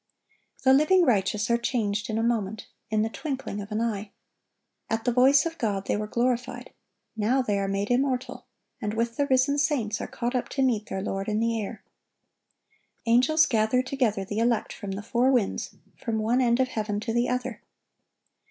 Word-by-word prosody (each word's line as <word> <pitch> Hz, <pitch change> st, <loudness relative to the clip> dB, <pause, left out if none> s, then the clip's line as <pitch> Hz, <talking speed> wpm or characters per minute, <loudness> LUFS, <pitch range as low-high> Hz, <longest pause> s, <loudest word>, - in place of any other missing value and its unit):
The 265 Hz, 0 st, +6 dB
living 330 Hz, +7 st, +5 dB
righteous 210 Hz, -1 st, +1 dB
are 235 Hz, -, +3 dB
changed 220 Hz, -2 st, -1 dB
"in 220 Hz, -, -1 dB
a 225 Hz, -, 0 dB
moment, 220 Hz, -3 st, -1 dB, 0.2 s
in 215 Hz, 0 st, +1 dB
the -, -, 0 dB
twinkling 265 Hz, -6 st, -4 dB
of 205 Hz, +2 st, -9 dB
an 215 Hz, +1 st, -1 dB
eye." 215 Hz, -3 st, -2 dB, 0.8 s
At 225 Hz, 0 st, -2 dB
the 245 Hz, -, +3 dB
voice 265 Hz, +5 st, +5 dB
of 330 Hz, 0 st, -4 dB
God 200 Hz, -4 st, -1 dB
they -, -, 0 dB
were 210 Hz, +1 st, -3 dB
glorified; 245 Hz, +2 st, -2 dB, 0.4 s
now 235 Hz, +5 st, +1 dB
they 205 Hz, -4 st, 0 dB
are 195 Hz, -, -1 dB
made 195 Hz, +3 st, -1 dB
immortal, 255 Hz, 0 st, -1 dB, 0.3 s
and 210 Hz, -1 st, -2 dB
with 230 Hz, +1 st, -1 dB
the 285 Hz, -, 0 dB
risen 275 Hz, +2 st, +3 dB
saints 255 Hz, -9 st, 0 dB
are -, -, -4 dB
caught 240 Hz, +1 st, -3 dB
up 250 Hz, -, -1 dB
to 270 Hz, -, 0 dB
meet 225 Hz, -4 st, +1 dB
their 190 Hz, 0 st, -4 dB
Lord 195 Hz, -1 st, -3 dB
in 210 Hz, 0 st, 0 dB
the 230 Hz, 0 st, 0 dB
air. 210 Hz, +1 st, -7 dB, 1.2 s
Angels 255 Hz, +7 st, +4 dB
"gather 230 Hz, 0 st, +2 dB
together 245 Hz, -7 st, 0 dB
the 205 Hz, +3 st, -3 dB
elect 230 Hz, -1 st, +1 dB
from 200 Hz, -3 st, -6 dB
the 200 Hz, +2 st, -5 dB
four 240 Hz, +4 st, +2 dB
winds, 240 Hz, -7 st, 0 dB, 0.2 s
from 230 Hz, -3 st, -2 dB
one 230 Hz, +4 st, +1 dB
end 240 Hz, 0 st, +2 dB
of 260 Hz, -1 st, +2 dB
heaven 210 Hz, -3 st, -2 dB
to 225 Hz, -, -3 dB
the 240 Hz, +1 st, +1 dB
other." 250 Hz, -3 st, -3 dB
230 Hz, 190 wpm, -26 LUFS, 210-255 Hz, 1.2 s, The